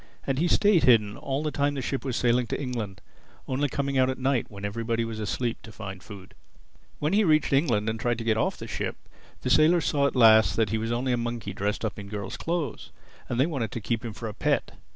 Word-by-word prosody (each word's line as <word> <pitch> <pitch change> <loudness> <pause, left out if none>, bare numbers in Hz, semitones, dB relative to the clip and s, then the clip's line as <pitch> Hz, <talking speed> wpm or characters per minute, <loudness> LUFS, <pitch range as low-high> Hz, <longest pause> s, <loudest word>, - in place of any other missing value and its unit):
And 135 -1 -1
he 170 - +2
stayed 200 0 +4
hidden 105 -4 +4
all 135 +4 -3
the 155 - -1
time 145 0 0
the 135 - -2
ship 135 - -2
was 130 -3 -2
sailing 120 0 +2
to - - -3
England—only 125 +3 -5
coming 140 0 -1
out 130 0 +4
at 130 - -2
night, 130 -1 0
when 100 -1 -7
everybody 115 +2 -1
was 115 -1 -5
asleep, 115 +3 -2
to 115 - -11
find 95 -3 -8
food. 95 -2 -12 0.6
When 150 +4 -1
he 215 +2 +4
reached 155 -5 +3
England 120 -7 +2
and 110 0 -1
tried 120 0 0
to 115 - -4
get 115 -1 +2
off 110 - 0
the - - -7
ship, - - -3 0.5
the - - -1
sailors 165 0 +5
saw 140 -1 +2
at - - -4
last 110 -3 +6
that 110 -3 +1
he 110 - 0
was 115 +1 -2
only 125 +2 0
a 125 - +2
monkey 115 -4 -4
dressed 105 +3 -2
up 110 - -4
in 100 - -8
girl's 100 -1 -5
clothes; 165 -7 -3 0.4
and 120 - -1
they 135 - +5
wanted 135 -9 -2
to - - -3
keep 115 +2 -2
him 115 -2 -5
for 115 +2 -6
a 105 - -5
pet. - - 0
120 Hz, 240 wpm, -27 LUFS, 110-140 Hz, 0.6 s, last